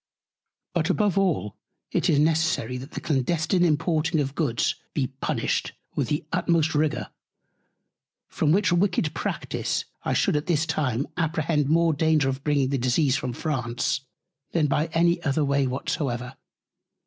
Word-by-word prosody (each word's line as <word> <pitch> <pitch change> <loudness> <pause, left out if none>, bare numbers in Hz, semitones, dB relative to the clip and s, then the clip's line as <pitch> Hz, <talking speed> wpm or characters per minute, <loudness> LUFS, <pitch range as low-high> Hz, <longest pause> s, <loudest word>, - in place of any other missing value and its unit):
But - - 0
above 205 -4 +2
all 165 - 0 0.3
it - - +1
is 145 - +4
necessary, 155 -5 +1
that 130 +4 -9
the - - -5
Clandestine 160 +5 +1
Importing 160 0 +1
of 135 -2 -1
Goods 140 -8 0 0.2
be 140 - +1 0.2
punished - - -1 0.2
with - - -1
the 150 0 -2
utmost 165 -2 +2
Rigour; 150 0 0 1.2
from 150 - 0
which 190 0 +3
wicked 175 -4 +1
Practice - - -2 0.2
I - - -1
should - - +2
at 150 +1 -1
this 165 -2 +2
Time 140 -5 -1
apprehend 160 -3 0
more 165 +1 +3
Danger 155 -2 +2
of 135 +1 -4
bringing 145 -3 +2
the 140 -1 0
Disease 130 +3 +2
from 130 -3 -2
France, 125 -4 -1 0.5
than 165 -3 +2
by 150 +3 +1
any 170 +2 +2
other 145 -1 +1
Way 140 -1 +2
whatsoever. 125 -1 -3
150 Hz, 150 wpm, -25 LUFS, 135-165 Hz, 1.2 s, is